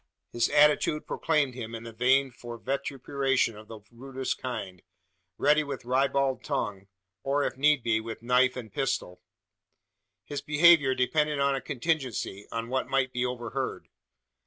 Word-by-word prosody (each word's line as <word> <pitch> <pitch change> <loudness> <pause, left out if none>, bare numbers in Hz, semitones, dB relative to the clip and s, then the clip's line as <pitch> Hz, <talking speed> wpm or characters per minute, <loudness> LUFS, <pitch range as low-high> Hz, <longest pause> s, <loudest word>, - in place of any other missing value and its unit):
His 120 0 +1
attitude 150 +1 +3
proclaimed 150 -5 0
him 115 -2 -6
in 115 - -7
the 115 -1 -9
vein 130 +3 +3
for 120 -1 -9
vituperation 135 -1 -1
of 105 +1 -12
the 110 -1 -10
rudest 130 +2 -4
kind 100 -8 -5 0.6
ready 150 +1 +3
with 140 -4 -6
ribald 135 +1 +1
tongue; 100 -1 -3 0.3
or, 140 +4 0
if - - -2
need 145 -1 +3
be, 115 -1 +2
with 115 0 -8
knife 125 +1 +3
and 115 -5 -8
pistol! 105 -9 -2 1.0
His 145 - -5
behaviour 150 -3 +5
depended 150 +3 +1
on 140 0 +2
a 135 - -2
contingency 130 - -2
on 115 0 -4
what 130 0 -1
might 135 -1 +1
be 125 - -1
overheard. 125 +1 -4
130 Hz, 150 wpm, -28 LUFS, 115-140 Hz, 1.0 s, behaviour